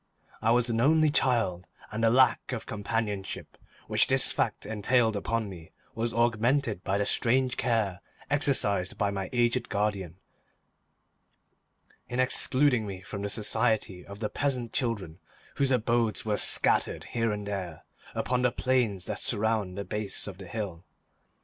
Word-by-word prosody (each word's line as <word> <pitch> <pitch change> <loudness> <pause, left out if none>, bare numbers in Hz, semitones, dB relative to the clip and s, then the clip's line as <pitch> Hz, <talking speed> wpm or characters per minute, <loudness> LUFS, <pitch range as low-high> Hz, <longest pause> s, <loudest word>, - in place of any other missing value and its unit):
I 110 - +1
was 120 +1 +3
an 115 -1 0
only 155 +3 +4
child, 115 - +1 0.2
and 110 +2 -3
the 115 - +5
lack 130 +3 +3
of 120 - -5
companionship 105 -2 -4 0.3
which - - +2
this - - +5
fact - - -1
entailed 110 +2 +1
upon 110 +2 -2
me 85 -4 -11 0.2
was 115 +1 -2
augmented 115 -1 +1
by 100 +1 0
the 100 - 0
strange 125 +3 +2
care 110 -6 0 0.3
exercised 110 -10 +1
by 100 -1 0
my 95 -1 -4
aged 120 0 +1
guardian 100 -5 -2 1.9
in 125 - -3
excluding 130 -2 +2
me 95 -2 -7
from 100 +1 -7
the 100 - -3
society 110 -3 +1
of 100 +2 -11
the 105 - -1
peasant 125 -5 -2
children 105 - -2 0.4
whose 140 -1 +2
abodes 115 -3 +1
were 105 -1 0
scattered - - +3
here 115 -2 +1
and 105 -1 -4
there 95 -6 -5 0.3
upon 125 0 0
the 125 -1 +2
plains 120 -9 0
that - - -3
surround 105 -3 0
the 100 - -4
base 105 -2 0
of 95 -2 -8
the 95 - -9
hill. 95 -5 -5
110 Hz, 150 wpm, -28 LUFS, 100-120 Hz, 1.9 s, the